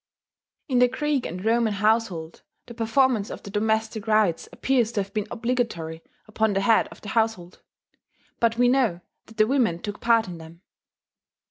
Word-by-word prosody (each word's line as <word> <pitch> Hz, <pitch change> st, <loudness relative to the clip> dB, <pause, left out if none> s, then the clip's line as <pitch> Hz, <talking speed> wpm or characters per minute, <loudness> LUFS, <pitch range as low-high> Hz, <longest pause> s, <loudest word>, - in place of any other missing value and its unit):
In 255 Hz, -4 st, +2 dB
the 250 Hz, -, +6 dB
Greek 275 Hz, +1 st, -1 dB
and 180 Hz, +4 st, -7 dB
Roman 225 Hz, -1 st, +2 dB
household 205 Hz, -6 st, 0 dB, 0.2 s
the 235 Hz, -, -10 dB
performance 230 Hz, -1 st, +1 dB
of -, -, -8 dB
the 200 Hz, -, -9 dB
domestic 220 Hz, +1 st, -1 dB
rites 215 Hz, -6 st, +2 dB
appears 245 Hz, -4 st, +1 dB
to 205 Hz, -3 st, 0 dB
have 195 Hz, -, -16 dB
been 215 Hz, -1 st, -2 dB
obligatory 225 Hz, -10 st, -2 dB, 0.3 s
upon 220 Hz, 0 st, 0 dB
the 195 Hz, -, +1 dB
head 220 Hz, +2 st, +3 dB
of -, -, -15 dB
the 205 Hz, -, -8 dB
household; 220 Hz, -6 st, -1 dB, 0.8 s
but 230 Hz, -1 st, +2 dB
we 245 Hz, 0 st, +4 dB
know 245 Hz, -9 st, +2 dB, 0.3 s
that 225 Hz, -, -16 dB
the 215 Hz, -, +5 dB
women 230 Hz, -9 st, +1 dB
took 205 Hz, +3 st, -7 dB
part 230 Hz, -2 st, +3 dB
in 175 Hz, -2 st, -8 dB
them. 165 Hz, +1 st, -13 dB
220 Hz, 170 wpm, -24 LUFS, 195-235 Hz, 0.8 s, the